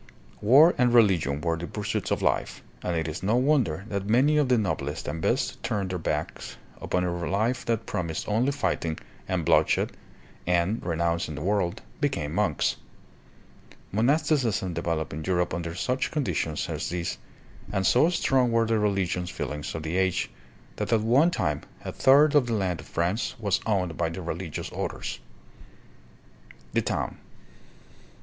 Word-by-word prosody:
War 140 +11 +7
and 125 -1 +4
religion 90 -11 +4
were 85 0 0
the 85 +1 -5
pursuits 105 -1 -3
of - - -1
life, - - 0 0.2
and 85 -2 -1
it 80 0 -1
is 80 - -5
no 105 +5 +1
wonder 125 - +2
that 100 -1 -3
many 135 +7 +4
of 145 -3 +2
the 125 - +4
noblest 80 -8 -2
and 80 - -3
best - - 0
turned 105 -5 -2
their 90 - -2
backs - - -3 0.2
upon 90 - 0
a 85 -1 -2
life 115 +6 0
that 115 -1 -1
promised 85 -3 -3
only 115 +6 +2
fighting 85 - -1 0.3
and - - -1
bloodshed - - +3 0.6
and, 90 +5 +1
renouncing 85 -2 -1
the 75 - -5
world, 100 -1 0 0.2
became 135 - -1
monks. - - +1 1.1
Monasticism 115 - +1
developed 85 -2 -2
in 80 +2 -5
Europe 90 -1 0
under 85 0 -4
such 125 +7 -1
conditions 85 - -1
as - - -3
these, 85 -1 -3 0.5
and 95 0 0
so 140 - +5
strong 130 -7 +2
were 115 0 +3
the 110 -1 +1
religious 95 -4 0
feelings 75 -1 -4
of 80 - -4
the 80 +3 -2
age 95 -1 +1 0.5
that - - -2
at 115 -2 +4
one 130 +10 +4
time 75 - -1 0.2
a - - -3
third 140 +3 +5
of 145 -5 +4
the 115 - -1
land 95 -5 0
of - - -10
France 90 +7 -1
was 105 -5 0
owned 90 -6 0
by 85 -1 0
the 85 +3 -6
re 85 - -2
ligious - - -6
orders. - - -4 1.5
The - - +3
Town. - - -3
95 Hz, 165 wpm, -26 LUFS, 85-120 Hz, 1.5 s, War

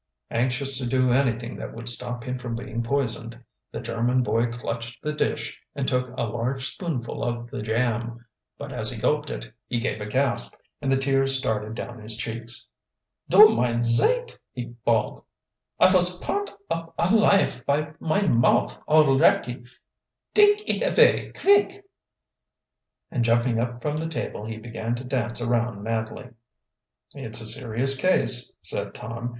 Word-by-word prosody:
Anxious 130 +3 -1
to 125 - -3
do 130 0 +2
anything 120 -2 0
that - - -7
would 115 0 -8
stop 120 0 -2
him 125 0 -4
from 120 -2 -5
being 120 -1 -4
poisoned, 120 -2 -2 0.3
the - - -5
German 120 +2 0
boy 115 +2 +1
clutched 120 0 -6
the 150 - -2
dish 150 - -2
and 140 -2 -2
took 125 0 0
a - - 0
large 120 +4 -2
spoonful 150 -10 -4
of 120 0 -4
the 135 - -5
jam. 115 +1 -2 0.3
But - - -7
as - - 0
he - - -5
gulped - - 0
it, - - -7
he 120 - -1
gave 115 -2 -3
a 105 - -4
gasp, 130 +3 0 0.3
and 135 -2 -1
the 135 - +3
tears 135 0 +3
started 110 -3 -2
down 120 -1 -7
his 110 +1 -2
cheeks. 115 0 -5 0.6
"Du 430 +1 +9
meine 120 -1 0
zeit!" 475 - +3 0.2
he 120 -1 -7
bawled. 115 -2 0 0.6
"I 185 - +6
vos 180 -1 +4
purnt 205 0 -2 0.2
up 165 0 -4
alife 195 - +3
by 150 +2 0
mine 165 -2 +1
mouth 125 - +2
alretty! 135 -4 +3 0.7
Dake 415 0 +5
it - - +1
avay - - +3
kvick!" 405 0 +3 1.3
And 120 - 0
jumping 115 0 +2
up 120 0 -3
from 150 0 -1
the 160 +1 -3
table 130 -8 -5
he 110 0 -6
began 115 +1 -4
to 120 - -7
dance 120 -2 -2
around 120 -3 -1
madly. 115 +3 -4 0.8
"It's 110 0 -1
a 110 - -4
serious 120 +4 +3
case," 135 -5 +2
said - - -2
Tom. 115 +2 -5
120 Hz, 155 wpm, -25 LUFS, 115-135 Hz, 1.3 s, Du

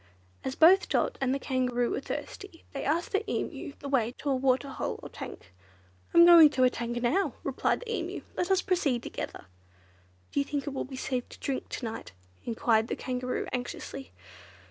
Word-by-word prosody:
As 265 - -3
both 365 +5 +6
Dot - - 0
and 265 -1 +2
the 275 - +1
Kangaroo 250 -3 0
were - - -1
thirsty, 345 +4 -7
they 275 - -4
asked 325 +5 0
the 400 - +2
Emu - - -3
the 285 - -5
way 245 -4 +1
to 285 - -2
a - - +3
waterhole 265 +1 0
or - - -7
tank. 90 - -9 0.6
"I - - 0
am 340 - +10
going 335 -3 +10
to 260 -3 +1
a 250 - +5
tank 240 0 -3
now," 295 +12 +1
replied - - 0
the 465 -1 -3
Emu; 355 +2 -4
"let 355 - -1
us 380 -1 +3
proceed 295 -11 +1
together." - - -6 0.9
"Do - - 0
you - - +3
think 280 -1 -3
it 285 - -4
will 270 - -3
be 265 - -8
safe 255 -1 -2
to - - -13
drink 270 -2 -3
to 245 - -4
night;" 225 - -6 0.3
enquired 225 -2 +2
the - - -2
Kangaroo 250 -1 -3
anxiously. 250 +1 -5
270 Hz, 195 wpm, -29 LUFS, 250-325 Hz, 0.9 s, am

